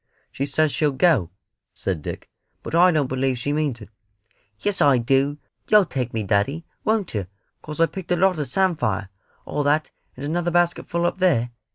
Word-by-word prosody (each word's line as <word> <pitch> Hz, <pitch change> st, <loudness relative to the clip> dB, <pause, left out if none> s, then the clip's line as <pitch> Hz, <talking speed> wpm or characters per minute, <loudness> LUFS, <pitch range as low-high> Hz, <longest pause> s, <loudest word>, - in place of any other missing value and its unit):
"She 140 Hz, -, -3 dB
says 155 Hz, +2 st, +2 dB
she'll 150 Hz, -1 st, +1 dB
go," 130 Hz, -, +3 dB, 0.5 s
said 90 Hz, -5 st, -3 dB
Dick, -, -, -6 dB, 0.4 s
"but -, -, -7 dB
I 175 Hz, +2 st, +6 dB
don't 155 Hz, -5 st, +2 dB
believe 130 Hz, 0 st, -1 dB
she 140 Hz, +4 st, -2 dB
means 145 Hz, -6 st, -1 dB
it." 105 Hz, -, -11 dB, 0.7 s
"Yes 205 Hz, -1 st, -1 dB
I 140 Hz, -3 st, +5 dB
do. 135 Hz, +4 st, +1 dB, 0.3 s
You'll 210 Hz, -2 st, +6 dB
take 125 Hz, -6 st, -3 dB
me, 110 Hz, -1 st, -2 dB
daddy, 110 Hz, -, 0 dB, 0.2 s
won't 215 Hz, -4 st, 0 dB
yer 100 Hz, -5 st, -2 dB, 0.3 s
'cos 150 Hz, 0 st, -8 dB
I've 165 Hz, -, +3 dB
picked 190 Hz, -2 st, -7 dB
a -, -, +4 dB
lot 180 Hz, -1 st, +2 dB
of 145 Hz, -, -2 dB
samphire 125 Hz, -, 0 dB, 0.4 s
all 150 Hz, -, -2 dB
that, 145 Hz, +2 st, +1 dB, 0.3 s
and 135 Hz, -, -5 dB
another 175 Hz, +3 st, -1 dB
basketful 175 Hz, 0 st, +1 dB
up 175 Hz, -, -1 dB
there? 140 Hz, -11 st, +2 dB
145 Hz, 185 wpm, -23 LUFS, 125-175 Hz, 0.7 s, I